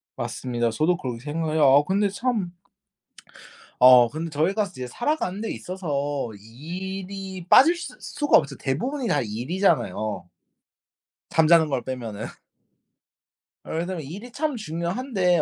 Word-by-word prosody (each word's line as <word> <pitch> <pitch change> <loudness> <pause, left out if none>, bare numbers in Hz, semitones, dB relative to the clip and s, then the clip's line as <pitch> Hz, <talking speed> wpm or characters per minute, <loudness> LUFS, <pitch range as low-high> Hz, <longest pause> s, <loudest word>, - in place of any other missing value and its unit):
맞습니다. 120 -2 -2
저도 155 +10 +1
그렇게 125 -5 -5
생각해요. 155 +2 -1
아 140 +1 +6
근데 200 +1 +2
참 210 -4 -2 1.3
어 125 -2 +8
근데 160 +2 -5
저희가 185 +9 +1
이제 130 -10 -6
살아가는 240 - -2
데 225 - -3
있어서 145 -8 -3
일이 185 - -7
빠질 330 +6 +7
수 350 - -7
수가 290 -1 +2
없죠. 140 -2 -2
대부분이 245 - -2
다 145 - +2
일이잖아요. 115 - -1 1.0
잠자는 160 0 +5
걸 130 -3 -1
빼면은. 115 -5 -5 1.4
예. - - -6
그래서 175 +2 -3
일이 195 - -8
참 300 0 -2
중요한데 180 - 0
165 Hz, 275 characters per minute, -24 LUFS, 135-195 Hz, 1.4 s, 어